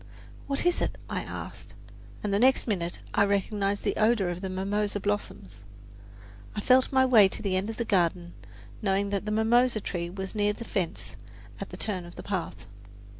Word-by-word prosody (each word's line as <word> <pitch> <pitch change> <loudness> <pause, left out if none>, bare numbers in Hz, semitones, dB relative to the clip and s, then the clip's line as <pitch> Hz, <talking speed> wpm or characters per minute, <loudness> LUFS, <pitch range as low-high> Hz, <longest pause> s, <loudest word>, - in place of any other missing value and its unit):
"What 275 +3 +1
is 355 0 +2
it?" - - -1
I - - -1
asked, - - -8 0.5
and 205 -1 -1
the 200 - +3
next 260 +3 +4
minute 175 -6 -2
I 205 - +4
recognized 200 0 0
the - - 0
odour 215 -4 +3
of 175 +1 -4
the 190 - -3
mimosa 205 +2 -1
blossoms. 105 - -4 0.9
I - - -2
felt 255 +4 +4
my 260 -1 +4
way 225 -6 +7
to - - -6
the 195 -2 0
end 190 +3 -1
of 225 - -5
the 235 - -1
garden, 175 -3 +1 0.5
knowing 200 0 +1
that 200 0 -1
the 210 - -2
mimosa 225 +2 +3
tree 175 -4 -3
was 190 +1 -6
near 210 -1 +1
the 230 +2 -8
fence, 180 -6 -3 0.4
at - - -5
the - - -8
turn 185 -5 -3
of 175 - -12
the - - -8
path. 190 -4 -4
200 Hz, 190 wpm, -28 LUFS, 185-220 Hz, 0.9 s, way